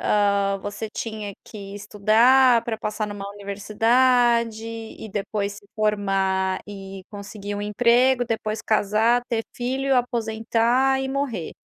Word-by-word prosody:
hã, 200 -1 +2
você 205 +2 -5
tinha 215 -2 -5
que 200 -2 -9
estudar 225 +5 +4
pra 225 -2 -3
passar 215 0 -3
numa 200 -1 -6
universidade 225 +3 +2
e 225 -1 -8
depois 205 0 -3
se 205 0 -14
formar 195 -3 0
e 195 -1 -9
conseguir 205 0 -7
um 205 - -4
emprego, 245 +4 +3
depois 220 -2 -3
casar, 220 +3 +2
ter 225 -3 -1
filho, 265 +2 0
aposentar 240 +2 +1
e 265 - -3
morrer. 265 - -3
215 Hz, 125 wpm, -23 LUFS, 205-240 Hz, -, estudar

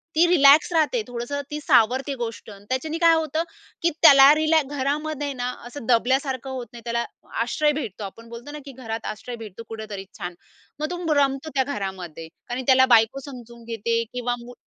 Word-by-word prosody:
ती 335 +2 +5
रिलॅक्स 300 -1 +6
राहते, 330 +9 +2
थोडंसं 245 +4 -4
ती 300 - -3
सावरते 260 0 +3
गोष्ट, 230 -1 -5 0.2
त्याच्याने 310 +5 -2
काय 335 -1 +5
होतं, 320 0 -1 0.4
की 340 - +3
त्याला 275 +1 +9
रिलॅ 315 0 +3 0.2
घरामध्ये 290 +1 -2
ना, 250 -1 -3 0.2
असं 245 -1 -9
दबल्यासारखं 260 +2 +1
होत 255 -2 -5
नाही. 235 - -10
त्याला 235 0 -1 0.4
आश्रय 295 +5 +1
भेटतो, 230 -8 -5
आपण 230 +4 -9
बोलतो 235 +5 -9
ना, 300 - -7
की 275 - -8
घरात 225 -3 -6
आश्रय 230 +3 -6
भेटतो 225 -1 -9
कुठेतरी 215 -3 -7
छान, 175 0 -5 0.4
मग 305 - -2
तुंब 350 -3 -3
रमतो 275 +2 +1
त्या 265 - +3
घरामध्ये, 180 - -6 0.2
कारण 245 +2 -4
त्याला 260 0 +6
बायको 225 +4 +2
समजून 235 -2 -11
घेते 230 0 -1
किंवा 245 0 -1
मु 245 - -10
260 Hz, 175 wpm, -24 LUFS, 230-295 Hz, 0.4 s, त्याला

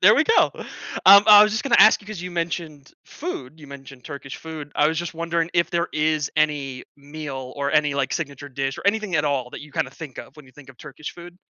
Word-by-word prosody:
There - - +7
we - - +3
go. 450 - +3 0.5
Um, 200 +1 +9
I 210 -1 +10
was 215 - +2
just 220 - -2
gonna 250 -4 +1
ask 220 - +7
you, 205 - -18
'cause 210 -5 -7
you 180 - -6
mentioned 165 -4 -5
food, 160 - -8
you 150 - -12
mentioned 135 -2 -12
Turkish 140 -2 -8
food, 155 -3 -9
I 150 - +3
was 160 0 -2
just 175 0 -4
wondering 170 0 -2
if 170 -1 +2
there 170 -1 -1
is 155 -1 0
any 145 -4 -1
meal, 140 -3 -8
or 140 0 -2
any, 150 -1 +2
like, 140 -2 -1
signature 145 -3 -5
dish, 135 0 -4
or - - -6
anything 210 -3 0
at 150 -1 +1
all 135 -4 -2
that - - -9
you 145 0 -13
kinda 130 - -2
think 145 -2 -10
of - - -10
when 150 -3 -14
you 130 - -20
think 140 0 -15
of 130 - -20
Turkish 150 0 -9
food? 175 0 -12
150 Hz, 245 wpm, -22 LUFS, 140-170 Hz, 0.5 s, I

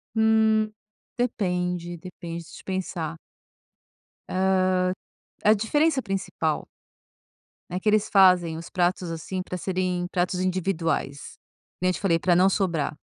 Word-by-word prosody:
Hum, 220 -1 +3 0.5
depende, 180 -7 -1
depende, 170 -1 -7
deixa 165 - -12
eu - - -31
pensar. 175 -4 -3 1.1
Hã, 185 +1 0 1.0
a 210 - +7
diferença 275 +7 +2
principal 195 -4 -2 1.0
é 180 - -3
que 210 - +1
eles 215 0 +2
fazem 180 -4 +5
os 165 - -8
pratos, 180 -1 0
assim, 165 +3 -4
para 180 - -5
serem 180 -1 -1
pratos 180 0 0
individuais. 170 -6 -1 0.4
Que - - -8
nem 185 - +4
eu - - +1
te - - -5
falei, 175 -4 +3
para 175 0 +3
não 185 +2 +5
sobrar. 170 -7 0
185 Hz, 135 wpm, -25 LUFS, 175-195 Hz, 1.1 s, a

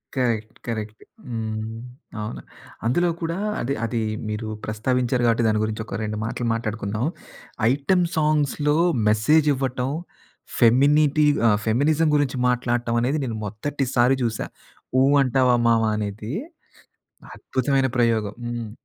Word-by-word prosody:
Correct. 115 -4 -1
Correct. 110 -1 -5 0.3
హ్మ్. 110 -1 -4 0.4
అవును. 65 - -5 0.4
అందులో 175 +9 +2
కూడా 165 +2 -2 0.2
అది 135 +3 -1
అది 115 0 -1 0.3
మీరు 110 +1 -4 0.2
ప్రస్తావించారు 120 +3 0
కాబట్టి 115 0 +2
దాని 110 -1 +2
గురించి 110 0 -3
ఒక - - -5
రెండు 105 0 -3
మాటలు 120 +1 -3
మాట్లాడుకుందాం. 110 0 -2 0.7
ఐటెమ్ 175 +6 +2
సాంగ్స్‌లో 150 -1 +1 0.3
మెసేజ్ 150 +9 +3
ఇవ్వటం, 130 -1 -2 0.7
ఫెమినిటి 145 +5 +4 0.2
ఆహ్, 105 -1 +4
ఫెమినిజం 150 +7 +2
గురించి 140 -3 +1
మాట్లాడటం 120 -1 0
అనేది 140 +5 0
నేను 115 -3 -4
మొదటి 135 +7 -3
సారి 125 +2 +4
చూశా. 115 -2 -2 0.5
'ఊ - - +5 0.2
అంటావా 130 -1 +3
మావా" 115 -1 +3
అనేది 105 +4 -4 1.0
అద్భుతమైన 135 - 0
ప్రయోగం. 110 -3 +1
హ్మ్. 120 -2 -4
120 Hz, 120 wpm, -23 LUFS, 110-140 Hz, 1.0 s, ఊ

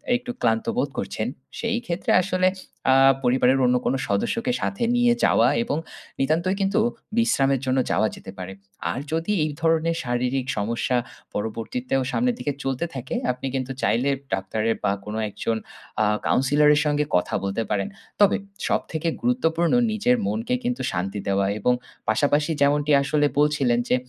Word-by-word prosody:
একটু 245 0 -3
ক্লান্ত 115 -1 +1
বোধ 140 - +1
করছেন 110 - -3 0.3
সেই 235 0 0
ক্ষেত্রে 170 +1 -1
আসলে 185 0 +1 0.4
আ - - +6 0.3
পরিবারের 125 +1 +3
অন্য 125 0 +3
কোনো 135 - +1
সদস্যকে 230 - 0
সাথে 200 - -2
নিয়ে 245 0 +4
যাওয়া 115 - +4 0.2
এবং 145 - -2 0.4
নিতান্তই 165 +7 +1
কিন্তু 195 +3 +2 0.4
বিশ্রামের 135 - +3
জন্য 130 0 +1
যাওয়া 110 - +3
যেতে 95 - -10
পারে। 95 +1 -6 0.4
আর 125 - -3
যদি 165 +5 -1
এই 155 - -1
ধরনের 165 0 +2
শারীরিক 125 +1 -1
সমস্যা 115 +4 0 0.4
পরবর্তীতেও 115 +5 -2
সামনের 245 0 +1
দিকে 145 - -1
চলতে 135 +4 -1
থাকে, 130 -1 -5 0.2
আপনি 125 +2 -5
কিন্তু 130 0 -2
চাইলে 125 +4 +2 0.2
ডাক্তারের 110 +4 0
বা 100 - +2
কোনো 105 +1 -4
একজন 115 +2 -2 0.5
আ - - +3 0.2
counselor 145 +3 +3
এর 150 - +2
সঙ্গে 150 0 +1
কথা 90 - +1
বলতে 100 +3 -1
পারেন। 100 -2 0 0.3
তবে 205 +1 +5 0.3
সবথেকে 160 +1 -1
গুরুত্বপূর্ণ 170 -9 +1 0.2
নিজের 220 +4 +2
মনকে 240 +3 -1
কিন্তু 245 +1 -1
শান্তি 95 +3 -3
দেওয়া 100 0 +2
এবং 125 +4 +3 0.4
পাশাপাশি 145 +7 +2
যেমনটি 145 +1 +3
আসলে 145 +1 +2
বলছিলেন 145 -5 +2
যে - - +4
135 Hz, 155 wpm, -24 LUFS, 115-165 Hz, 0.5 s, আ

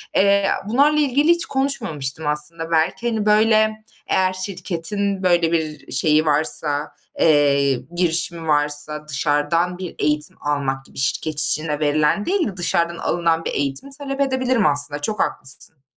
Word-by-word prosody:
Eee, 200 0 +3
a - - -3
bunlarla 290 +6 +3
ilgili 290 +1 +1
hiç 340 0 +3
konuşmamıştım 160 - -2
aslında 165 +3 +1
belki, 165 +8 0
hani, 220 -2 -2
böyle, 215 0 +2 0.2
eğer 185 0 +1
şirketin, 190 +1 -2
böyle, 175 -2 +2
bir 155 -3 -3
şeyi 155 +4 +2
varsa, 150 -1 +1 0.2
eee, 140 -3 +3 0.2
girişimi 170 -1 -1
varsa 150 0 +1
dışarıdan 150 +5 0
bir 185 -2 -8
eğitim 150 0 -1
almak 135 -2 -2
gibi - - -16
şirket 150 +3 -1
içine 155 -1 +1
verilen 150 +6 +1
değil 380 -4 0
de 195 -3 -8
dışarıdan 170 -1 0
alınan 165 -1 -1
bir - - -2
eğitimi 140 - -2
talep 275 -1 -4
edebilirim 255 -5 0
aslında. 145 0 +2
Çok 210 +7 -3
haklısın. 135 +2 -1
165 Hz, 145 wpm, -20 LUFS, 150-205 Hz, 0.2 s, Eee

